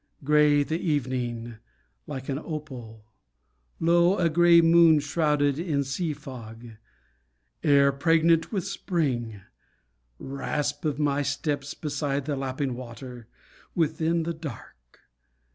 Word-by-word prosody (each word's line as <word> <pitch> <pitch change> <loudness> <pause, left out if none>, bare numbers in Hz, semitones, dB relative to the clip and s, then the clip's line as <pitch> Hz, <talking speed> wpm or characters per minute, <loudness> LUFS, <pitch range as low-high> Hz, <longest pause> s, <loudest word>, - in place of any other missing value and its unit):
Grey 150 0 +4
The 160 +3 -3
evening, 125 -6 -2 0.5
like 135 -3 -6
an 135 0 -2
opal; 130 -9 -8 0.7
low, 170 +3 +3
A 170 -2 +2
grey 170 +1 +6
moon 165 -1 +6
shrouded 145 -1 +1
in 155 -5 0
sea 155 +5 -2
fog: 125 -6 -9 1.0
Air 140 -2 +4
pregnant 165 +3 +2
with 195 -5 -2
spring; 130 - -2 0.8
rasp 145 - -3
of 150 -3 0
my 145 -1 +1
steps 145 0 -2
Beside 145 -2 -2
the 145 -1 -2
lapping 135 0 -3
water; 120 -1 -9 0.5
within 165 0 +1
The 170 +1 -2
dark. 115 - -11
145 Hz, 110 wpm, -26 LUFS, 130-160 Hz, 1.0 s, grey